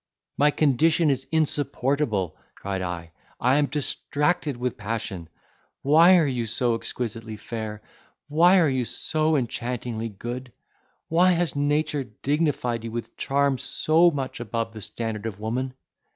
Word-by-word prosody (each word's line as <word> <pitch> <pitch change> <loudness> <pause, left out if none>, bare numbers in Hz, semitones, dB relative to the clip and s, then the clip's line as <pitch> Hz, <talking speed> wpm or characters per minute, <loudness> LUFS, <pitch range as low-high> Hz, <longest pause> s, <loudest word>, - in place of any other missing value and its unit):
"My 145 +1 +4
condition 155 +2 +3
is 135 0 -2
insupportable!" 140 - 0 0.2
cried 95 -1 -4
I: 85 -2 -5 0.3
"I 130 +3 +3
am 145 -1 +3
distracted 150 +1 -1
with 125 0 -2
passion! 105 -6 -5 0.5
Why 165 +6 +7
are 165 - +4
you 125 -4 -1
so 120 +2 +2
exquisitely 115 -1 -4
fair?—why 120 - 0
are 165 - +4
you 130 -2 0
so 155 +6 +1
enchantingly 120 -3 -3
good?—why 125 - -2
has 170 -4 0
nature 145 0 0
dignified 125 0 -1
you 115 - -4
with 115 +1 -6
charms 140 -1 +1
so 165 +3 +4
much 135 -5 -4
above 115 -1 -3
the 110 - -8
standard 110 0 -4
of 105 -3 -6
woman? 125 +4 -3
130 Hz, 130 wpm, -25 LUFS, 115-150 Hz, 0.5 s, Why